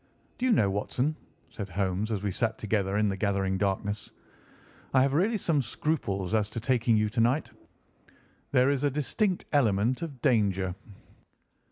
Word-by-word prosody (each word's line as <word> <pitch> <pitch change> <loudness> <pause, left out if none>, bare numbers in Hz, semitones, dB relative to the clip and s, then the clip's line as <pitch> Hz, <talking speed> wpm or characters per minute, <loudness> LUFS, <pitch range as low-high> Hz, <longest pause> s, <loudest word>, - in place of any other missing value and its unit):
"Do 255 - +1
you - - +3
know, 105 - +3
Watson," 125 +9 -1 0.4
said 100 -2 -6
Holmes 95 +3 -1
as 105 -2 -2
we 100 - 0
sat 110 +3 -1
together 100 -2 0
in 105 0 +2
the 95 - -1
gathering 95 -1 0
darkness, 100 +1 -2 0.8
"I 130 - +6
have 135 0 +1
really 200 +9 +2
some 165 -7 +1
scruples 110 - -2
as 105 -2 +2
to 115 - -5
taking 120 -2 +2
you 105 0 +2
to 115 +2 0
night. 125 +7 +1 1.0
There 130 0 +4
is 140 -1 -1
a 145 - +3
distinct 175 - -1
element 120 - +2
of 150 -6 -6
danger." 100 -6 +2
110 Hz, 165 wpm, -28 LUFS, 100-140 Hz, 1.0 s, I